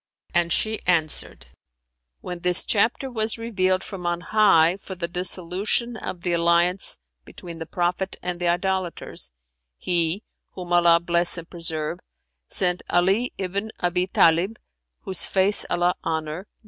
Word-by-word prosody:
and 175 -1 +2
she 220 +4 +1
answered, 160 - 0 0.8
"When 180 -1 -6
this 180 0 +1
chapter 230 +5 +2
was 220 -1 0
revealed 190 -5 0
from 180 -3 -6
on 175 0 0
high 180 -4 +4
for 195 -1 -8
the 170 -1 -3
dissolution 185 +6 -1
of 180 -5 -6
the 175 - 0
alliance 170 +2 +3 0.3
between 170 - -10
the 165 - -6
Prophet 180 +2 -1
and 180 -1 -3
the 175 - 0
idolaters, 180 - -1 0.5
He 175 - 0 0.3
(whom 180 -1 -5
Allah 170 -1 +6
bless 170 +1 +1
and 165 -1 -7
preserve!) 165 -1 -4 0.5
sent 180 -1 0
Ali[FN#368] 195 +8 +2
ibn 200 +3 -3
Abν 180 +1 0
Tαlib 170 +6 +4 0.5
(whose 190 -2 0
face 195 +2 +2
Allah 175 +1 +2
honour!) 160 +3 -3
180 Hz, 135 wpm, -24 LUFS, 170-190 Hz, 0.8 s, Allah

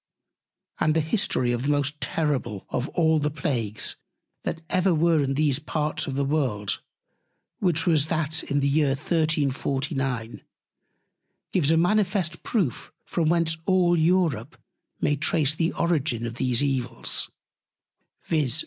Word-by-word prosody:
And 155 0 +2
the - - +4
History 155 - +1
of 120 0 -1
the 140 - -1
most 145 +1 0
terrible 130 - -1
of 125 +4 -2
all 160 -2 +2
the 150 0 0
Plagues, 125 - -1 0.4
that 165 - -4
ever 185 0 +2
were 160 -1 +3
in 135 0 -1
these 145 -2 +2
Parts 150 0 -2
of 135 - -3
the 140 0 0
World, 130 -9 -1 0.8
which 175 -2 +1
was 155 -4 +3
that 160 -1 0
in 145 0 -1
the 140 - +2
Year 140 -1 +2
1349, 140 -5 -1 1.1
gives 160 -6 +2
a 165 - +4
manifest 180 -1 +1
Proof 185 - -1
from 165 -3 0
whence 165 -1 +1
all 180 -2 +4
Europe 160 -6 +1 0.4
may 145 - +2
trace 150 0 +1
the 165 +1 0
Origine 145 -9 0
of 115 - -4
these 125 +1 +1
Evils, 125 -4 -1 0.9
viz. 150 -3 +1
150 Hz, 140 wpm, -25 LUFS, 135-165 Hz, 1.1 s, the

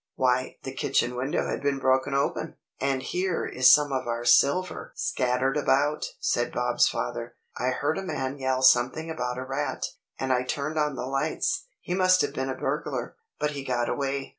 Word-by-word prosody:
"Why 130 0 +1
the - - -5
kitchen 125 0 0
window 130 +3 -1
has - - -2
been 140 0 0
broken 130 +1 +1
open, 140 - -1 0.2
and 135 -1 0
here 180 -1 -1
is 130 0 +5
some 145 0 +5
of 130 -2 -2
our 120 0 -2
silver 140 +9 +3
scattered 130 +2 0
about," 145 +1 +1
said 120 - 0
Bob's 125 0 +2
father. 120 0 -4 0.2
"I 125 - 0
heard 145 +6 0
a - - -5
man 135 -6 -3
yell 130 -1 0
something 130 +6 +4
about 125 -5 -3
a 130 - -3
rat, 135 +3 -2 0.3
and 130 -1 0
I 125 - +2
turned 145 +4 -2
on 150 -2 0
the 125 - -4
lights. 155 - -1
He 180 - -4
must 185 0 +4
have 145 -1 -1
been 135 -2 -2
a 130 - -2
burglar, - - -3 0.2
but 150 0 0
he 140 -2 -5
got 120 -3 -1
away." 140 -1 -2
135 Hz, 190 wpm, -27 LUFS, 130-150 Hz, 0.3 s, is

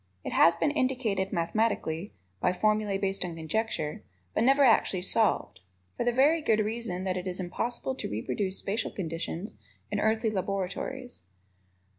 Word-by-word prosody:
It - - -4
has 170 - +6
been 290 - +1
indicated 245 -9 0
mathematically 185 -1 0 0.3
(by 180 - +2
formulae 210 0 +1
based 195 -1 -1
on 175 -2 -4
conjecture), 160 -1 -2 0.3
but - - +2
never 275 +3 +5
actually 210 -7 +4
solved 210 - +2 0.4
for - - -1
the 240 - +2
very 290 +7 +4
good 220 -7 +3
reason 215 -4 -3
that 185 -1 -1
it 180 +1 -4
is 180 0 -3
impossible 235 +8 -2
to 260 - -5
reproduce 185 - -2
spacial 215 +3 -1
conditions 165 - -4 0.3
in - - 0
earthly 220 0 +2
laboratories. 200 +6 -3
200 Hz, 150 wpm, -29 LUFS, 180-230 Hz, 0.4 s, has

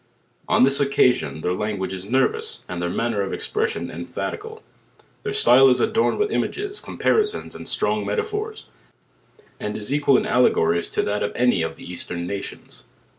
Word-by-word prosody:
On - - +4
this 135 +1 +4
occasion 125 - +2
their 90 - 0
language 95 -1 -3
is 95 +1 -7
nervous, 130 +2 0
and 90 -1 -5
their 90 - -1
man 115 +6 -1
ner 105 -3 -1
of 95 - -2
expression 440 +2 -2
emphatical. 445 +1 -6 0.6
Their 425 - -3
style 135 - +6
is 125 0 +3
adorned 225 +1 +2
with 420 0 0
images, 410 0 -1
comparisons 425 0 0
and - - -8
t - - -1
trong - - 0
metaphors, 430 0 -3 0.9
and 105 - -4
is 110 +5 -3
equal 145 -2 +4
in - - 0
allegories 85 -8 +2
to - - +1
that 105 0 -1
of 105 - -1
any 125 -7 +2
of 80 0 -3
the - - -13
eastern 85 -1 -4
nations. 100 +2 -7
125 Hz, 175 wpm, -23 LUFS, -, 0.9 s, style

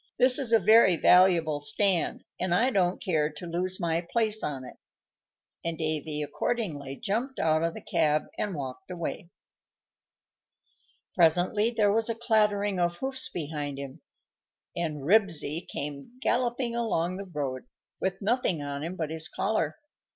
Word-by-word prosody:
"This 255 +1 +5
is 255 -5 -1
a 225 - +7
very 220 -4 +6
valuable 170 -5 +4
stand, 190 +2 +1
and 180 -1 +1
I 250 +8 +3
don't 185 -4 +1
care 155 -6 0
to 150 +4 -8
lose 180 +2 -2
my 165 -2 0
place 220 -2 +1
on 135 -3 -4
it;" - - -12 0.9
and 170 -1 -2
Davy 155 -1 -1
accordingly 145 - -3
jumped 235 - -3
out 155 0 +2
of 165 0 -1
the - - -9
cab 150 0 +1
and 205 -4 -3
walked 140 +7 -7
away. 170 -1 -5 1.8
Presently 180 +6 +3
there 210 -4 +2
was 225 +1 +2
a 230 - -1
clattering 210 -4 +1
of 175 0 +1
hoofs 265 0 -2
behind 145 -3 -4
him, 140 +2 -8 0.7
and 155 -4 -3
Ribsy 170 -3 +2
came 145 - -5
galloping 240 -1 0
along 185 -7 -1
the 200 - -6
road, 135 -5 -4 0.3
with 190 +1 -2
nothing 200 - 0
on 140 0 -4
him 170 +3 -4
but 160 -3 -3
his 160 0 0
collar. 180 -7 -1
175 Hz, 150 wpm, -28 LUFS, 155-215 Hz, 1.8 s, a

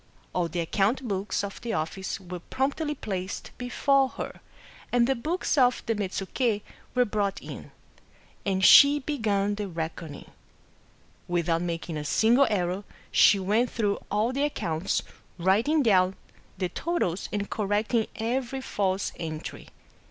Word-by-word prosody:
All 175 -2 +1
the 170 +1 -2
account 210 +9 0
books 200 0 -1
of 200 0 -6
the 235 -1 -3
office 190 +4 -3
were 180 -1 -7
promptly 285 - -2
placed 190 -6 -5
before 265 +2 +2
her, - - -7 0.2
— - - -21
and 240 -1 +4
the 270 - +2
books 310 +4 -1
of 250 -1 +3
the 230 - +1
Metsuke 205 +2 -1 0.3
were 250 0 +4
brought 205 -2 -1
in; - - -9 0.7
and 190 -1 +1
she 285 +1 +9
began 220 -8 0
the 205 0 -3
reckoning. 165 -3 -6 1.0
Without 170 -1 +1
making 165 -2 -3
a 150 - -3
single 235 - +4
error, 185 -1 -1 0.3
she 205 - +6
went 210 +6 +1
through 205 -3 0
all 215 +5 +1
the 275 - -1
ac 290 0 +1
counts, 160 +2 -1 0.3
writing 220 - +3
down 190 -4 +4 0.4
the 185 -1 -1
totals 195 - -2
and 205 -1 -3
correcting 210 +2 0
every 250 +3 -2
false 195 -6 -1
entry. 155 -2 -6
205 Hz, 145 wpm, -27 LUFS, 185-245 Hz, 1.0 s, she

